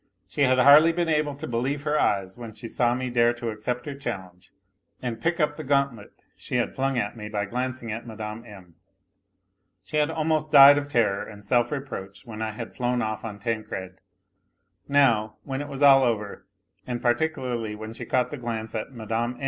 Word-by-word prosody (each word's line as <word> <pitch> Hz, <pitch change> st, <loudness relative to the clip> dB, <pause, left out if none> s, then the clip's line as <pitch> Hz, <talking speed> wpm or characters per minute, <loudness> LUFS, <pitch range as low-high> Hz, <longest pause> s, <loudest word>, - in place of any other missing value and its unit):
She 145 Hz, -, -4 dB
had 130 Hz, -2 st, +4 dB
hardly 145 Hz, +5 st, +8 dB
been 170 Hz, 0 st, -1 dB
able 150 Hz, -2 st, +1 dB
to 145 Hz, +3 st, -7 dB
believe 135 Hz, +3 st, -2 dB
her 150 Hz, 0 st, 0 dB
ey< 100 Hz, -9 st, +2 dB
s 95 Hz, 0 st, -14 dB
when 115 Hz, -2 st, -9 dB
she 115 Hz, -, -7 dB
saw 120 Hz, +1 st, +1 dB
me 130 Hz, 0 st, -3 dB
dare 120 Hz, 0 st, +3 dB
to 120 Hz, -1 st, -5 dB
accept 120 Hz, +3 st, -4 dB
her 145 Hz, -, -4 dB
challenge, 95 Hz, -9 st, -7 dB, 0.5 s
and 115 Hz, -3 st, -5 dB
pick 170 Hz, +2 st, 0 dB
up 150 Hz, -1 st, +1 dB
the 155 Hz, -, -5 dB
gauntlet 140 Hz, -6 st, -1 dB
she -, -, -6 dB
had 120 Hz, -1 st, 0 dB
flung 135 Hz, -1 st, 0 dB
at 105 Hz, -2 st, -1 dB
me 105 Hz, -2 st, -7 dB
by 105 Hz, -1 st, -2 dB
glancing 125 Hz, +1 st, -4 dB
at 115 Hz, +3 st, -6 dB
Mme. 110 Hz, 0 st, -6 dB
M. 95 Hz, -6 st, -14 dB, 1.1 s
She 150 Hz, -, -4 dB
had 150 Hz, 0 st, +2 dB
almost 155 Hz, -1 st, 0 dB
died 140 Hz, 0 st, +9 dB
of 145 Hz, -, -6 dB
terror 105 Hz, -7 st, +1 dB
and 105 Hz, -1 st, -11 dB
self 120 Hz, +4 st, +2 dB
reproach 100 Hz, -9 st, -6 dB
when 110 Hz, -2 st, -8 dB
I 110 Hz, -1 st, -2 dB
had 115 Hz, +1 st, -7 dB
flown 125 Hz, -1 st, 0 dB
off 110 Hz, 0 st, -3 dB
on 110 Hz, -3 st, -6 dB
Tancred; 105 Hz, -4 st, -4 dB, 0.9 s
now, 120 Hz, -7 st, +3 dB
when 135 Hz, 0 st, -4 dB
it 145 Hz, -, -6 dB
was 140 Hz, 0 st, -4 dB
all 135 Hz, -1 st, +8 dB
over, 110 Hz, -5 st, -2 dB, 0.4 s
and 120 Hz, -1 st, -3 dB
particularly 120 Hz, -4 st, -1 dB
when 110 Hz, +1 st, -8 dB
she -, -, -8 dB
caught 125 Hz, -1 st, 0 dB
iho 145 Hz, -, -6 dB
glance 115 Hz, -2 st, -4 dB
at 110 Hz, +4 st, -4 dB
Mme. 115 Hz, 0 st, -3 dB
120 Hz, 200 wpm, -25 LUFS, 110-140 Hz, 1.1 s, died